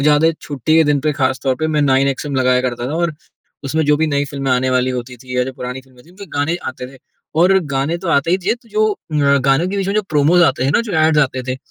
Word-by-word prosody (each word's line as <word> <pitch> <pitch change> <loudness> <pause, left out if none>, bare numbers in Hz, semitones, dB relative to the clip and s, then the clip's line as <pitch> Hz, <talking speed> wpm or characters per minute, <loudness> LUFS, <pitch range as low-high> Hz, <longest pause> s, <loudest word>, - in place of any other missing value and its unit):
ज़्यादा 150 +2 +4
छुट्टी 145 +2 -1
के 160 - +5
दिन 145 -1 +1
पे 150 +1 0
खास 130 -2 -1
तौर 135 -2 +1
पे 155 - +1
मैं 150 -2 +1
नाइन 135 0 +3
एक्सएम 140 +1 -3
लगाया 125 -1 +3
करता 120 -1 -3
था, 145 - -4
और 170 -2 -1 0.5
उसमें 155 +3 0
जो 150 0 +3
भी 160 +1 +1
नई 145 -1 0
फ़िल्में 140 -1 -4
आने 130 +1 +1
वाली 130 0 +1
होती 125 0 -5
थी 125 +1 -8
या 125 - +2
जो 130 - -6
पुरानी 125 +1 -6
फ़िल्में 130 -1 -21
थीं, 170 - -19
उनके 200 +2 -11
गाने 160 +4 0
आते 125 -1 -7
थे। - - -16 0.4
और 185 +2 +5 0.2
गाने 140 +5 0
तो 185 -1 -6
आते 155 +1 +2
ही 185 - +2
थे, 195 +5 0
त 240 -1 -22
जो 215 +1 +2
अ, 145 -6 0
गानों 135 +6 +2
के 200 - -3
बीच 195 -1 -1
में 200 - -1
जो 215 - +2
प्रोमोज़ 155 +4 +4
आते 130 -3 +1
हैं 135 - +1
ना, - - +3
जो 230 -4 -5
ऐड्स 155 -1 +3
आते 130 -2 -1
थे, - - -8
145 Hz, 280 wpm, -17 LUFS, 130-160 Hz, 0.5 s, के